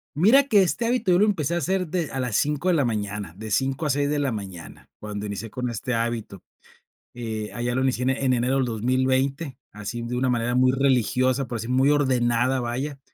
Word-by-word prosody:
Mira 225 - +5
que, 210 -7 +5
este 220 +6 -1
hábito 235 -5 +1
yo 175 - +4
lo 210 - +5
empecé 170 -7 0
a - - +1
hacer 185 +3 0
de 170 -1 -2
a 135 - -4
las 125 -5 -2
5 150 +4 +1
de - - +4
la 150 -4 +3
mañana, 105 -6 -3
de 110 +1 -7
5 135 - 0
a - - 0
6 145 +1 0
de 150 - 0
la 140 -2 0
mañana. 95 -6 -8
Cuando 105 0 -5
inicié 105 +2 -6
con 125 +2 -3
este 120 +2 -3
hábito, 115 -4 -3 0.7
eh, 110 -3 -4
allá 120 +1 -2
lo 130 - +1
inicié 130 -1 0 0.2
en 130 - +3
enero 125 +1 +1
del 135 - +2
2020, 130 +4 0
así 105 +3 -6
de 120 +1 -4
una 130 +1 +1
manera 120 0 0
muy 130 0 +4
religiosa, 130 0 +2
por 120 -1 -4
decir, 115 +2 -6
muy 130 +2 +3
ordenada, 130 -3 +2
vaya. 130 +4 -3
130 Hz, 215 wpm, -24 LUFS, 115-145 Hz, 0.7 s, Mira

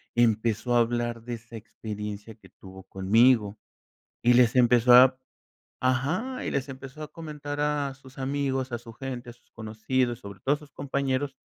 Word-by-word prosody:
empezó 115 0 +2
a 120 - +5
hablar 120 0 0
de 120 - -5
esa 115 +1 -13
experiencia 105 -1 -7
que 110 - -19
tuvo 95 0 -13
conmigo, 105 +3 +3 0.6
y 120 +1 +5
les 120 0 +5
empezó 125 0 +5
a 130 +1 +8 0.6
ajá, 150 - -1
y - - -2
les 135 +1 -2
empezó 135 +2 -9
a 150 - -9
comentar 150 -3 -7
a 145 -2 0
sus 135 0 -17
amigos, 135 -1 -1
a 120 - -2
su 115 -1 -12
gente, 125 -1 -6
a - - -14
sus 120 - -32
conocidos, 115 +3 -2
y - - -28
sobre 100 -1 -10
todo 135 +9 +1
a - - -9
sus 150 -2 -16
compañeros 135 0 -2
125 Hz, 175 wpm, -27 LUFS, 115-135 Hz, 0.6 s, a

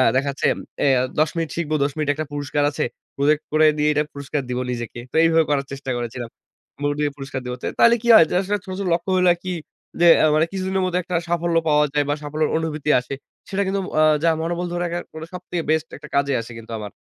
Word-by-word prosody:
দেখা 135 +2 +1
যাচ্ছে 140 - -1 0.4
এ - - +4 0.3
১০ 155 0 +3
মিনিট 165 -2 -1
শিখবো, 155 -2 -1
১০ 140 - 0
মিনিট 150 -2 -1
একটা 155 +2 -4
পুরস্কার 145 0 -1
আছে। - - -2 0.3
প্রজেক্ট 150 +2 +2
করে 155 0 +5
দিয়ে 150 0 +2
এটা 150 0 +2
পুরস্কার 140 +1 -3
দিবো 125 0 -1
নিজেকে। 120 0 -5
তো - - -10
এইভাবে 165 0 +4
করার 140 -1 +1
চেষ্টা 135 -1 -5
করেছিলাম। 120 0 -5 0.5
মোড 145 0 +1
দিয়ে 145 -1 +1
পুরস্কার 135 -1 -5
দিবো। 125 0 -3
ত - - -24 0.2
তাইলে 235 0 +7
কি - - -3
হয় 190 - +8
যে - - -2
আসলে 200 +2 -1
ছোট, 185 - -6
ছোট 195 - -2
লক্ষ্যগুলো 185 +2 +1
আরকি 180 +2 -6 0.5
যে 175 - +7 0.2
আ - - +6
মানে 155 - +4
কিছুদিনের 190 0 -1
মধ্যে 180 0 0
একটা 180 +1 -4
সাফল্য 170 0 0
পাওয়া 150 -1 +4
যায় 145 -1 +2
বা, - - +3
সাফল্যের 150 +1 -1
অনুভূতি 155 -2 -3
আসে। 125 +2 -7 0.4
সেটা 200 0 -1
কিন্তু 195 +1 0
ম - - -7
আ - - +6 0.2
যা 165 - +5
মনোবল 170 +2 -2
ধরে 175 0 -2
রাখার 175 0 -3
কোনো, 160 0 -7
সবথেকে 180 -1 -4
বেস্ট 160 0 +1
একটা 150 0 -12
কাজে 140 0 +2
আসে 115 - -10
কিন্তু 115 0 -11
আমার। 105 -1 -7
155 Hz, 230 wpm, -22 LUFS, 140-175 Hz, 0.5 s, হয়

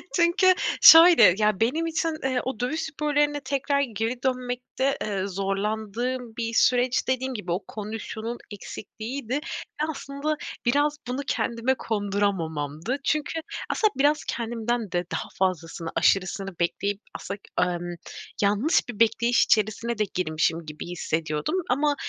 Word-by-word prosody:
Çünkü 360 +2 +5 0.3
şöyle, 325 - +9
ya, 210 -2 +2
benim 305 +9 +1
için, 330 0 0 0.2
ııı, 260 -1 +1
o 260 -4 -4
dövüş 255 +7 -1
sporlarına 295 -1 0
tekrar 280 +1 0
geri 235 0 -3
dönmekte, 255 +1 -1
ııı, 195 -1 -2
zorlandığım 220 +5 -2
bir 230 -1 -2
süreç 245 +1 +3
dediğim 260 0 -1
gibi 205 -6 -5
o 180 +3 -1
kondisyonun 220 +2 -5
eksikliğiydi. 220 +4 -7
Ve 295 - -1 0.5
aslında 280 +1 -3 0.3
biraz 290 +4 +2
bunu 255 +3 -2
kendime 235 +3 0
konduramamamdı. 200 - -2
Çünkü 305 +3 0 0.3
aslında 430 -2 +2
biraz 295 +2 +3
kendimden 230 -2 -2
de 175 0 -1
daha - - -3
fazlasını, 170 -3 -1
aşırısını 195 -1 +1
bekleyip, 200 +4 -1
aslında 200 +2 -6 0.2
ımm, 175 -1 -1 0.5
yanlış 210 +9 +2
bir 230 -3 -7
bekleyiş 230 +1 +3
içerisine 215 +2 +1
de 215 - +2
girmişim 165 -1 0
gibi 155 +2 -8
hissediyordum 160 - -2
ama, 290 +3 +2
230 Hz, 130 wpm, -25 LUFS, 195-270 Hz, 0.5 s, şöyle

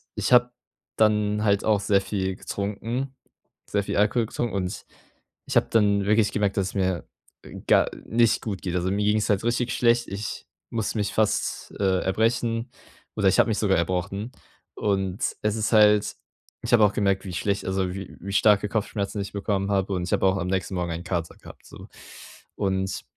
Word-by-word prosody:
ich - - -2
habe 125 0 +5 0.5
dann 105 -1 +2
halt 100 -1 +2
auch 105 -2 +3
sehr 100 -1 +2
viel 95 -2 -2
getrunken 115 +9 -4 0.5
sehr 100 0 -1
viel - - -3
Alkohol 105 +3 +2
getrunken. 120 +1 -3
Und 90 -2 -3 0.6
ich - - -4
habe - - +5
dann 100 -3 +3
wirklich 105 0 +3
gemerkt, 100 -1 0
dass 95 -1 +1
es - - -9
mir, 95 -3 -1 0.4
äh, - - -11
gar - - +4 0.2
nicht 115 0 +2
gut 100 -5 -4
geht. 90 -1 -3
Also, 90 +1 0
mir 100 +1 0
ging's 105 0 +1
halt 100 0 +2
richtig 120 +1 0
schlecht. 120 0 +3
Ich 100 +2 -5 0.2
musste 110 -1 -2
mich 105 - -1
fast, 110 -1 0
äh, 95 -2 +2
erbrechen 115 +4 0 0.5
oder 100 - +1
ich 95 - +2
habe - - +3
mich 110 - 0
sogar 100 -3 +2
erbrochen. 90 +6 -2 0.4
Und 95 -1 -1 0.2
es 105 +1 0
ist 110 +1 -1
halt 105 -1 +5 0.5
ich - - -4
habe 110 - +6
auch 105 - +3
gemerkt, 100 -1 +1
wie 95 - -6
schlecht 100 +4 -1
also, 95 -1 -1
wie 95 0 -8
wie 100 - -6
starke 105 0 +4
Kopfschmerzen 105 -1 -2
ich 100 - -5
bekommen 100 -1 -1
habe 95 0 0
und 90 -1 -2
ich 90 - -5
habe - - +2
auch 95 0 +3
am 90 - -3
nächsten 95 0 -2
Morgen 85 -1 -2
einen 85 +2 -5
Kater 85 -4 -3
gehabt, - - -14
so. - - -12 0.7
Und 95 -1 -1
100 Hz, 190 wpm, -25 LUFS, 95-110 Hz, 0.7 s, habe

